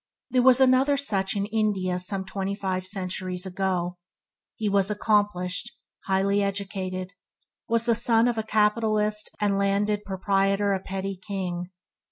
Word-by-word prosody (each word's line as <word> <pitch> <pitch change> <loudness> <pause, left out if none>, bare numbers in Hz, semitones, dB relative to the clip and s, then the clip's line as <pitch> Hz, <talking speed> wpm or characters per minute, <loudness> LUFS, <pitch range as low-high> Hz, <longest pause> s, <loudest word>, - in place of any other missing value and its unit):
There 255 0 +4
was 255 0 +6
another 265 +2 +4
such 200 -8 -1
in 200 0 0
India 205 -4 0
some 190 +1 -3
twenty 195 +1 -3
five 185 -2 -1
centuries 185 -1 -3
ago. 180 -2 -2 0.6
He 215 - -2
was 200 -1 +2
accomplished, 205 -2 0 0.4
highly 195 +1 +2
educated, 190 -2 -3
and 195 - -45
was 230 0 +2
the 235 - +4
son 230 0 +3
of 240 - +1
a - - +2
capitalist 215 0 +1
and 200 -2 +1
landed 205 +1 +1
proprietor 195 +1 +1
a 190 - 0
petty 195 +1 -4
king. 185 -3 -4
200 Hz, 145 wpm, -26 LUFS, 190-215 Hz, 0.6 s, was